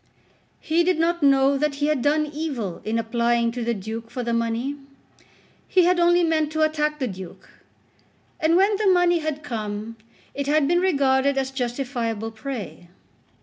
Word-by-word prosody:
He 330 +2 +1
did 360 0 +1
not 340 +1 0
know 275 -1 +4
that 300 -1 0
he 290 +1 -1
had 300 -3 +1
done 305 +3 +2
evil 285 - -4
in 220 +1 -1
applying 235 +1 +1
to 245 0 -4
the 235 0 -1
Duke 220 +3 -6
for 245 +1 -5
the 235 0 -2
money. 230 +4 -1 0.9
He 370 - +4
had 360 +1 +3
only 345 0 +4
meant 315 -2 +1
to 315 0 +1
attack 300 -1 0
the 265 -3 -2
Duke; 190 -4 -9 0.9
and 320 +1 +3
when 395 +3 +3
the 425 0 0
money 355 -2 +4
had 305 -1 -4
come 220 -3 -5 0.4
it 280 0 -4
had 295 -1 +3
been 345 +3 +3
regarded 280 -6 +2
as 265 0 -1
justifiable 240 -4 -3
prey. 220 -6 -7
275 Hz, 170 wpm, -23 LUFS, 235-315 Hz, 0.9 s, know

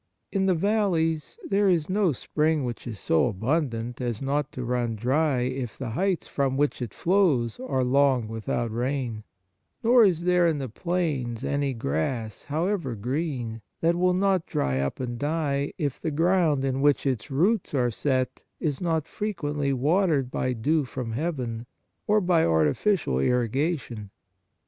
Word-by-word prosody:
In 195 -1 +1
the 185 - +3
valleys 170 - 0
there 200 0 +3
is 165 -4 +2
no 190 -2 +2
spring 150 +4 0
which 120 -1 -5
is 110 -4 -6
so 80 +8 +2
abundant 120 - -1
as 120 -3 -2
not 140 +1 -1
to 125 - -4
run 120 -1 -1
dry, 130 +4 +1
if 125 -2 -3
the 125 -4 -4
heights 185 - 0
from 135 -2 0
which 145 -2 0
it 120 -4 -3
flows 165 - +1
are 135 - -1
long 130 -2 +3
without 115 +1 -2
rain; 120 -2 -2 0.6
nor 240 +1 +6
is 175 -5 +3
there 180 -1 +4
in 160 -2 +1
the 135 -3 -4
plains 145 -6 -2
any 140 -2 0
grass, 110 - -2
however 160 - -1
green, 120 -1 -3 0.2
that 170 +1 +3
will 180 +1 +2
not 190 -2 +1
dry 65 -1 0
up 70 0 -2
and 120 -2 -4
die, 145 -2 -1
if 145 -6 -2
the 160 - -1
ground 160 -3 +2
in 135 0 -1
which 145 0 +3
its 130 -1 -1
roots 175 +6 +1
are 125 -2 +2
set 130 +2 -1 0.2
is 150 -2 -2
not 165 -3 0
frequently 150 -9 -2
watered 145 0 +2
by 130 - -1
dew 145 +7 +1
from 125 -2 -5
heaven 120 -4 -3 0.4
or 210 +1 +4
by 175 -4 +3
artificial 80 - +2
irriga 125 - +1
tion. 105 -6 -9
140 Hz, 160 wpm, -26 LUFS, 120-170 Hz, 0.6 s, nor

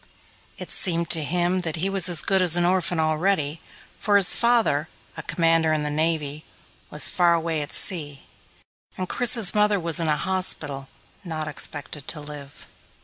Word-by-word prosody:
It - - -9
seemed 170 -2 -1
to 160 -2 +5
him 175 +4 0
that 165 -3 -4
he 175 +4 -2
was 195 -2 +2
as 170 -3 0
good 190 -1 +1
as 175 -2 +4
an 175 0 +1
orphan 180 -1 0
already, 155 -1 -1 0.4
for 205 0 0
his 200 -3 +7
father, 230 -11 +1 0.3
a - - -7
Commander 165 -1 +1
in 155 -1 -1
the 150 - -3
Navy, 155 -1 -1 0.5
was 150 - +4
far 175 -2 +2
away 165 -2 -2
at 145 - -6
sea, 145 -7 -1 0.7
and 185 - -4
Chris's 230 -2 +2
mother 210 -1 +2
was 170 -1 0
in 165 - -2
a 150 -1 +1
hospital, 155 -8 -1 0.4
not 160 -3 -5
expected 145 -1 -2
to 155 - -5
live. 145 -1 -11
165 Hz, 170 wpm, -23 LUFS, 150-185 Hz, 0.7 s, his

